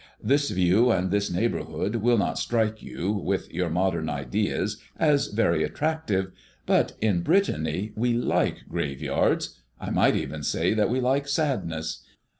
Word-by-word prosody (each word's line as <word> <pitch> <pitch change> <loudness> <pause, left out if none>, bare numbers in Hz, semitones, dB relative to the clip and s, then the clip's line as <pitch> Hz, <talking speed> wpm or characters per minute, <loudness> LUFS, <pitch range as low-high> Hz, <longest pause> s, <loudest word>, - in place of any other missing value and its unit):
This 140 +5 +2
view 95 +7 +3
and 95 -4 +1
this 100 0 +1
neighborhood 105 +2 -1
will 120 +2 +3
not 100 - 0
strike 110 -2 0
you, 95 +4 -3
with 100 -2 -2
your 90 0 -1
modern 85 -2 0
ideas, 70 -5 -1 0.2
as 150 -3 +3
very 115 +2 +1
attractive; 145 -12 -1 0.3
but - - +2
in 100 -5 +2
Brittany 100 - 0
we 120 +2 +1
like 120 - 0
graveyards, 70 -2 -1 0.2
I - - -5
might - - +3
even 75 +2 -3
say 85 +6 +1
that 105 -2 +2
we 125 +2 +1
like 135 +3 +1
sadness. 105 - -2
105 Hz, 145 wpm, -26 LUFS, 90-120 Hz, 0.3 s, view